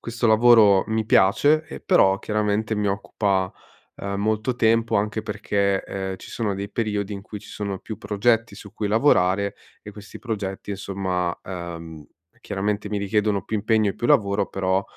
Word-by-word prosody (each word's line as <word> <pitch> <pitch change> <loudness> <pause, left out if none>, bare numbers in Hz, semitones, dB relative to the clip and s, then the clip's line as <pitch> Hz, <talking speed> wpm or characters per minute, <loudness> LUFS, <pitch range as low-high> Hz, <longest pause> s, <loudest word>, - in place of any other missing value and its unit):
questo 115 0 -2
lavoro 110 -3 +6
mi 110 0 0
piace, 145 +12 +4
ehm, - - -9
però 95 0 +4
chiaramente 105 0 -1
mi 105 -1 -1
occupa, 100 -1 -1 0.4
ehm, 100 0 -4
molto 110 +4 0
tempo 115 0 +2
anche 105 +2 -1
perché, 100 -2 -1
ehm, 95 -1 -4
ci - - -12
sono 110 -4 -2
dei 100 +1 -5
periodi 105 -2 -2
in 100 - -5
cui 105 0 -8
ci 105 - -15
sono 100 -2 -4
più 110 -2 -8
progetti 115 +2 +1
su 100 - -12
cui 105 - -3
lavorare, 100 -4 +2 0.3
e 105 - -10
questi 105 0 -11
progetti, 100 -4 -5
insomma, 95 -3 -2
uhm, 85 -4 -7 0.3
chiaramente 105 +1 -2
mi 105 - -2
richiedono 100 -1 0
più - - -5
impegno 110 0 +2
e - - -8
più 120 - -3
lavoro 100 -1 +3
però, 95 0 0
105 Hz, 170 wpm, -23 LUFS, 95-110 Hz, 0.4 s, lavoro